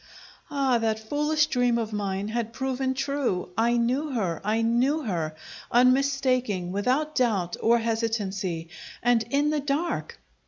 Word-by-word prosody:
Ah, 270 -4 +1
that 220 -1 0
foolish 300 +7 +1
dream 245 -5 +1
of 225 -2 -3
mine 200 0 -2
had 230 0 -3
proven 265 0 -1
true: 270 -8 -1
I 235 +2 +2
knew 255 +6 0
her, 185 -9 -1
I 220 +3 +1
knew 255 +7 +2
her, 165 - -2 0.4
unmistaking, 255 -6 +2
without 255 +10 0
doubt 200 - +1
or 235 +1 +4
hesitancy 210 -7 -2 0.3
and 240 -1 +4
in 285 +3 +2
the 305 - +1
dark! 290 +4 -2
235 Hz, 135 wpm, -26 LUFS, 210-270 Hz, 0.4 s, or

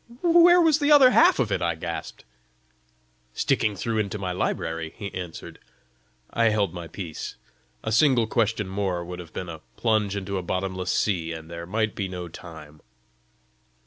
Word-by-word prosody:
"Where 345 +1 +7
was 320 -3 +4
the 290 0 +2
other 275 -4 +8
half - - +5
of 120 -5 0
it?" - - 0
I 85 -1 0
gasped. 85 0 -6 1.1
"Sticking 110 -2 +1
through 110 +3 -2
into 105 0 -2
my 95 -2 -3
library," 80 -2 -3
he 100 -3 -6
answered. 90 -3 -7 0.7
I 115 - +1
held 105 -5 +2
my 85 -2 -7
peace. 80 -1 -7 0.5
A 110 - -2
single 120 0 +4
question 110 -2 0
more 95 -3 -2
would 90 +1 -7
have 85 -2 -10
been 90 - -5
a 80 -2 -8 0.2
plunge 110 -3 +1
into 100 -1 -3
a - - -4
bottomless 95 0 -3
sea, 85 -5 0
and 80 0 -9
there 85 0 -7
might 110 +2 0
be 100 - -3
no 90 -1 -6
time! 80 -3 -12
95 Hz, 170 wpm, -25 LUFS, 85-110 Hz, 1.1 s, other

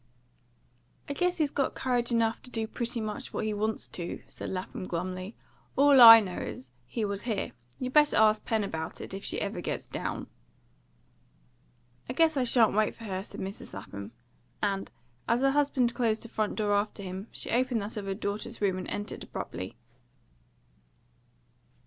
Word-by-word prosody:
"I 285 - -2
guess 360 +4 +1
he's 300 -3 +1
got 275 - 0
courage 245 -2 0
enough 225 -1 +1
to - - -11
do 225 -2 -2
pretty 235 +1 -3
much 215 -1 -5
what - - -2
he 215 - 0
wants 215 +1 -1
to," 175 -1 -6
said - - -7
Lapham 185 0 -5
glumly. 185 +4 -4 0.4
"All 280 -1 +7
I 225 -1 +13
know 185 -4 -4
is, 130 -1 -7 0.2
he 225 -3 -2
was 200 -1 -2
here. 220 -5 -2 0.3
You 255 0 -3
better 295 +1 +5
ask 215 0 +5
Pen 220 -2 0
about 160 -5 -4
it, - - -7
if 195 - -6
she - - -2
ever - - -3
gets - - -3
down." - - -4 1.8
"I - - -1
guess 320 +2 +4
I 260 -2 +2
shan't 230 -3 +4
wait 215 +1 +2
for 230 - -12
her," 190 -3 -3
said - - -8
Mrs. 195 +1 -6
Lapham; 100 +1 -7 0.5
and, 195 -2 -1 0.4
as 235 +2 +2
her 270 0 +4
husband 270 -4 +2
closed 225 -3 0
the 230 - -9
front 215 -1 -1
door 210 -2 +1
after 205 0 0
him, 190 +3 -6
she - - -4
opened 245 -2 +1
that 210 +3 -6
of 210 -2 -4
her 195 - -1
daughter's 210 +3 -4
room 190 -3 +1
and - - -6
entered 205 0 -4
abruptly. - - -6
220 Hz, 180 wpm, -29 LUFS, 195-245 Hz, 1.8 s, I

